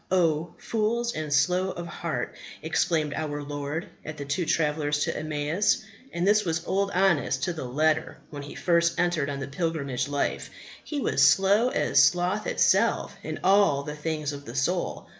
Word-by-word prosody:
O 165 -3 +1
fools 235 +2 -1
and 155 -1 -4
slow 180 +6 +2
of 175 -2 -5
heart! 160 -7 -4 0.3
exclaimed 160 -2 0
our 145 -1 -3
Lord 145 +5 -4 0.2
at 155 -1 -7
the 140 - -5
two 150 +5 -2
travellers 150 -2 +1
to - - -2
Emmaus. 155 +8 0 0.3
And 175 +2 -1
this 210 +1 +4
was 165 -2 -2
Old 195 +1 0
Honest 175 -8 +1
to 175 - 0
the 155 -5 -6
letter 155 +5 0
when 145 -1 -6
he 145 - -9
first 170 -1 +1
entered 170 -5 +1
on 140 -1 -4
the 135 - -4
pilgrimage 140 -4 -2
life; 145 0 -2 0.3
he 295 - -4
was - - 0
slow 200 +5 +3
as - - +3
sloth 180 +4 +1
itself - - +2
in - - -5
the 155 -7 +3
things 155 -2 -2
of 140 0 -9
the 115 - -8
soul. 175 +6 -1
160 Hz, 170 wpm, -26 LUFS, 145-180 Hz, 0.3 s, this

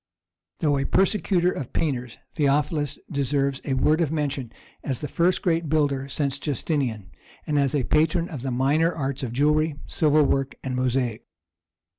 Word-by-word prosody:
Though 145 -3 +2
a 135 - -1
persecutor 190 -2 +2
of 135 - -6
painters, 125 -6 -2
Theophilus 145 0 0
deserves 140 -1 0
a 135 - -1
word 155 +5 +3
of 155 -3 +1
mention 140 -6 -2 0.3
as 130 -3 -2
the 150 - -4
first 175 +5 +1
great 165 -3 +1
builder 140 -3 +1
since 140 0 -1
Justinian, 130 - -2 0.3
and 150 -1 +1
as 140 0 +1
a 140 - +1
patron 160 +5 +2
of 150 -8 -7
the 135 - -3
minor 140 +7 +2
arts 140 -4 -3
of 125 -4 -3
jewellery, 150 +4 +2
silver 155 -1 +3
work, 135 -1 0
and 130 -1 -3
mosaic. 125 -2 -1
145 Hz, 160 wpm, -24 LUFS, 135-155 Hz, 0.3 s, word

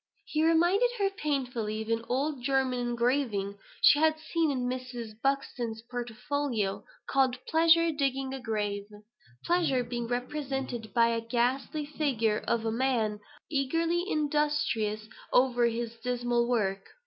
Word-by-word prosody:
He 310 0 0
reminded 345 +8 +4
her 395 -2 +1
painfully 250 - -2
of 220 - -10
an 230 0 0
old 275 +2 -1
German 265 -1 +1
engraving 240 -4 0 0.2
she 290 - +7
had 315 0 +3
seen 320 +1 0
in 255 -3 -1
Mrs. 250 -3 -5
Buxton's 245 -5 -1
portfolio, 240 -2 -2 0.2
called, 260 -2 +2
"Pleasure 330 +1 +5
digging 270 -2 -1
a 270 - -4
Grave;" 205 -4 -2 0.6
Pleasure 325 -8 +2
being 240 0 -4
represented 255 -2 -3
by 230 -1 +5
a 230 0 0
ghastly 250 +5 -1
figure 255 -8 0
of 235 - +2
a - - -10
young 225 0 -1
man, 225 -6 +1 0.3
eagerly 330 +5 +1
industrious 295 - 0 0.2
over 245 -2 +4
his 230 0 -3
dismal 240 -1 0
work. 195 -5 0
250 Hz, 135 wpm, -29 LUFS, 230-290 Hz, 0.6 s, she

